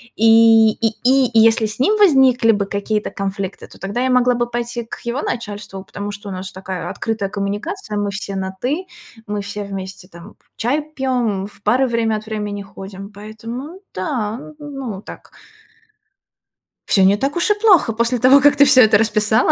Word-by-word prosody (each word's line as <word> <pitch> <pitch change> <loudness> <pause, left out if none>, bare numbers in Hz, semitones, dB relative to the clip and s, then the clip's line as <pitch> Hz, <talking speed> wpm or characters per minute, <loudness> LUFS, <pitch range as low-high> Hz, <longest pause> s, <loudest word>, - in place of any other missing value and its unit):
И 225 0 +6
и 225 +1 -1 0.2
и 260 +1 +4
и 230 - +3
если 225 0 +4
с 215 +2 -5
ним 420 +11 +2
возникли 265 - +5
бы 205 -2 0
какие-то 205 +2 -2
конфликты, 195 -1 -5
то - - -16
тогда 200 +5 -3
я 260 - +1
могла 250 0 +3
бы 240 - 0
пойти 240 0 -3
к - - -9
его 240 +4 -2
начальству, 205 -4 -5
потому 205 +1 -6
что 205 0 -8
у - - -6
нас 190 0 -6
такая 190 -2 -6
открытая 220 -3 -3
коммуникация: 210 - -4
мы 205 -1 -1
все 200 -1 -5
на 190 0 -4
ты, 305 +9 -2 0.4
мы 210 0 -3
все 205 +1 -6
вместе 190 -2 -8
там 175 +3 -14 0.2
чай 255 +7 0
пьём, 240 -7 -1
в 200 - -18
бары 255 +5 +2
время 230 -2 0
от 215 - -9
времени 210 -2 -4
ходим, 195 0 -10
поэтому, 230 - -8
да, 215 +2 -3
ну 295 - -11
да, 295 - -10
н 290 - -8
ну 260 -5 -5
вот 195 - -12
так. - - -12 1.6
Всё 195 - +4
не 200 +2 +4
так 275 +7 -2
уж 345 +4 +2
и - - +6
плохо, 370 - +4
после 235 +2 0
того, 260 +4 +6
как 290 +1 +5
ты 285 0 +6
всё 265 -2 +7
это 215 -3 +6
расписала. 215 0 +2
220 Hz, 195 wpm, -19 LUFS, 200-250 Hz, 1.6 s, всё